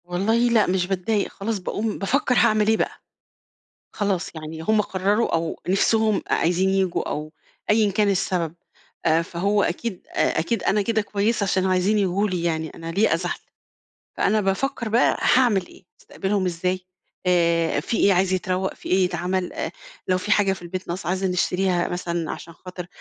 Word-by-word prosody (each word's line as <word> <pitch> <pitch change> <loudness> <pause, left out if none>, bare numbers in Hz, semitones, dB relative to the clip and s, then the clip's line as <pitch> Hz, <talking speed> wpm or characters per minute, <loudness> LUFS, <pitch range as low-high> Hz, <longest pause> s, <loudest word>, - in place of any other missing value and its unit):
والله 185 +5 0
لأ، 225 -3 +4
مش 180 -1 +1
باتضايق 195 +2 0
خلاص 210 +1 -3
باقوم 210 +4 -3
بافكر 250 +5 +1
هاعمل 215 -1 +4
إيه 220 0 +4
بقى. - - -2 0.9
خلاص، 200 -4 -1
يعني 160 0 -7
هُم 215 +5 +3
قرروا 205 +3 0
أو 165 0 -2
نفسهم 215 +2 +2
أ - - -2
عايزين 180 +3 +2
ييجوا 190 -2 0
أو 155 +1 -4 0.4
أيًا 210 -1 +4
كان 205 +2 +2
السبب. 175 -4 -1 0.5
آآ، 160 0 +4
فهو 200 +5 0
أكيد 190 +2 -3
آآ، - - +1
أكيد 185 +5 -1
أنا 210 +3 +2
كده 220 +1 0
كويسة 205 +1 0
عشان 190 -1 +1
عايزين 185 +3 +2
ييجوا 200 +1 +1
لي 180 -3 -2
يعني، 160 -2 -1
أنا 165 0 -7
ليه 200 +6 +2
أزعل؟ - - -2 0.8
فأنا 215 +1 +2
بافكر 225 +5 -1
بقى 235 +3 +3
هاعمل 230 -8 +3
إيه؟ - - -17 0.2
أستقبلهم 195 0 -2
إزاي، 180 +1 -1 0.5
آآ، 170 -3 +2
في 220 +9 -2
إيه 200 - +4
عايز 185 +1 +2
يتروّق؟ 185 0 -1
في - - -10
إيه 185 0 +4
يتعمل؟ 180 +1 -2
آآ، - - -3 0.4
لو 185 - +2
في 210 +3 -3
حاجة 200 -2 +4
في 190 - -10
البيت 180 +2 -6
ناقصة 175 +1 -4
عايزة 190 +1 0
نشتريها 180 0 +1
مثلًا 170 -2 -3
عشان 170 - -8
خاطر 180 +1 -9
190 Hz, 170 wpm, -23 LUFS, 175-210 Hz, 0.9 s, لأ